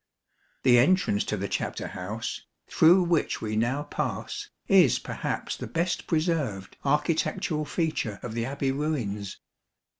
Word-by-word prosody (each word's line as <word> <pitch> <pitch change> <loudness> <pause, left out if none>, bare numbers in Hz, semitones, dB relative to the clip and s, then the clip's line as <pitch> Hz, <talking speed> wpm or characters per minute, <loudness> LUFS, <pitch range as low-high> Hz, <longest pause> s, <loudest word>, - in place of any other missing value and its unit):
The 120 -2 +6
entrance 145 - +3
to 105 - -2
the 100 +1 -2
chapter - - -3
house, 105 +5 -5 0.3
through 175 +3 +6
which 170 -3 +1
we 110 -1 -3
now 120 +6 +1
pass, 145 - -4 0.2
is - - +6
perhaps - - -3
the - - -6
best 170 +1 -1
preserved 155 - -1
architectural 150 +1 0
feature 150 - -2
of 120 - -5
the 115 0 -1
Abbey 135 0 -1
ruins. 120 -9 -3
140 Hz, 130 wpm, -27 LUFS, 110-160 Hz, 0.3 s, The